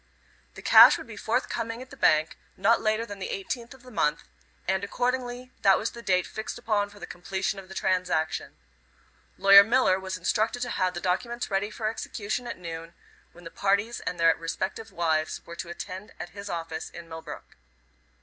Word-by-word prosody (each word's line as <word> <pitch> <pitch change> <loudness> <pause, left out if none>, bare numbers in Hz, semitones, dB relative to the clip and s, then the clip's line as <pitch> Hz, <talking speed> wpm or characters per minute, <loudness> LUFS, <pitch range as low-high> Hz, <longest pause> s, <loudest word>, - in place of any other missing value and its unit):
The - - -10
cash - - +9
would - - -9
be - - -10
forthcoming 230 0 -2
at 255 +1 -11
the - - -9
bank 155 +1 +3 0.2
not 230 +3 +3
later 215 +1 +1
than 205 -3 -8
the 190 - -4
18th 235 +6 -4
of 255 - -19
the 255 - -13
month, 150 -7 0 0.4
and 190 +1 +1
accordingly 250 +3 -2
that 195 -1 +6
was 220 - -2
the 235 - -10
date 185 -4 +2
fixed 220 - -6
upon 205 -2 0
for 205 0 -15
the - - -6
completion 190 +2 -3
of 190 -1 -12
the 190 - -9
transaction. 180 -4 -1 0.8
Lawyer 200 +1 +9
Miller 225 -4 +3
was 190 -1 -4
instructed 215 +7 0
to 245 - -4
have 185 -1 0
the 175 - -4
documents 235 +6 -2
ready 195 +2 0
for 215 0 -3
execution 220 +2 -3
at 235 - -5
noon, 165 -1 -7 0.4
when 175 - -16
the 165 - -9
parties 200 +4 +1
and 175 0 -4
their 165 -1 +5
respective 190 +6 -4
wives 160 -3 -1
were 170 - -9
to 170 0 -6
attend 185 +3 -7
at 175 - -6
his 200 +3 -8
office 165 -1 -4
in 170 -1 -10
Millbrook. 160 0 -9
195 Hz, 190 wpm, -27 LUFS, 175-225 Hz, 0.8 s, cash